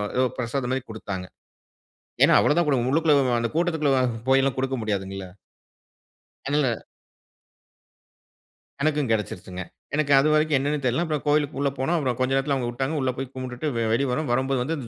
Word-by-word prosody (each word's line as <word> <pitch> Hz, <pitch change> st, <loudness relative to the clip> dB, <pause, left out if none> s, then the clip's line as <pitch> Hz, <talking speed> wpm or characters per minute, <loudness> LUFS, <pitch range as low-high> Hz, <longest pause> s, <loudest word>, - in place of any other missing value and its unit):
ஏதோ 130 Hz, -, +3 dB
பிரசாதம் 125 Hz, +1 st, -2 dB
மாரி 130 Hz, -, -1 dB
குடுத்தாங்க. 100 Hz, -4 st, -5 dB, 1.0 s
ஏன்னா, -, -, +6 dB
அவ்வளோ -, -, +3 dB
தான் 175 Hz, -, +3 dB
குடுக்க 130 Hz, -4 st, +1 dB
உள்ளுக்குள்ள 145 Hz, -5 st, +3 dB
அந்த 115 Hz, 0 st, -1 dB
கூட்டத்துக்குள்ள 160 Hz, -4 st, +1 dB, 0.4 s
போய்லாம் 135 Hz, 0 st, +3 dB
குடுக்க 130 Hz, 0 st, -1 dB
முடியாதுங்கல்ல. 95 Hz, -2 st, -3 dB, 1.2 s
அதனால 140 Hz, -3 st, +2 dB, 2.1 s
எனக்கும் 150 Hz, -3 st, +1 dB
கெடைசிருச்சுங்க. 95 Hz, -4 st, -3 dB, 0.3 s
எனக்கு 145 Hz, -1 st, 0 dB
அது 145 Hz, +3 st, +3 dB
வரைக்கும் 155 Hz, -1 st, +3 dB
என்னனே 145 Hz, +2 st, -1 dB
தெரில. 125 Hz, +7 st, +1 dB
அப்புறம் 150 Hz, -5 st, -2 dB
கோயிலுக்கு 145 Hz, -2 st, +1 dB
உள்ள 140 Hz, -, +2 dB
போனோம், 135 Hz, +6 st, +1 dB
அப்புறம் 130 Hz, -6 st, -1 dB
கொஞ்சம் 130 Hz, +1 st, +1 dB
நேரத்துல 140 Hz, +1 st, 0 dB
அவங்க 120 Hz, -2 st, -2 dB
வுட்டாங்க. 135 Hz, +5 st, -2 dB
உள்ள 130 Hz, -1 st, +1 dB
போய் 135 Hz, 0 st, -5 dB
கும்புட்டுட்டு 130 Hz, +3 st, -4 dB
வெ 115 Hz, -, 0 dB
வெளிய 135 Hz, +3 st, +1 dB
வரோம், 150 Hz, +2 st, -1 dB
வரும்போது 130 Hz, 0 st, +1 dB
வந்து 160 Hz, +5 st, -2 dB
அந்த 125 Hz, -5 st, -7 dB
135 Hz, 160 wpm, -24 LUFS, 125-150 Hz, 2.1 s, ஏன்னா